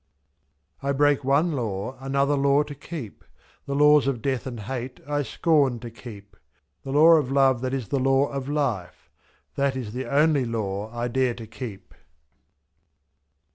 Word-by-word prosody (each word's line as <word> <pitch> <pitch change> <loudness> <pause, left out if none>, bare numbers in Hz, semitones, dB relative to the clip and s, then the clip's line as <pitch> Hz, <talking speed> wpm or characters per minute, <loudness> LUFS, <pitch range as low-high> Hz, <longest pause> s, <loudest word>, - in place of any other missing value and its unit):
I 140 0 0
break 145 0 +2
one 140 +6 +2
law, 115 -3 -3
another 140 +2 +1
law 140 +1 +3
to 145 - -8
keep; 145 - -8 0.4
The 140 - -2
laws 150 -1 +5
of 135 -4 0
death 130 -2 -1
and 120 -4 -6
hate 125 +3 -5
I 145 0 0
scorn 145 -3 +1
to 120 -1 -8
keep, 105 -4 -12 0.5
/»y.The - - -8
law 160 +2 +7
of 140 -4 -1
Love 135 -3 +3
that 130 0 -2
is 130 -5 -3
the 140 - 0
law 135 +1 +3
of 140 0 -5
Life 120 -12 -3 0.2
— - - -40
That 140 -1 +1
is 115 -5 -5
the 130 +1 -4
only 145 0 +3
law 105 -3 -3
I 120 0 -3
dare 125 0 0
to 115 - -9
keep. 110 -2 -9
135 Hz, 170 wpm, -25 LUFS, 120-140 Hz, 0.5 s, law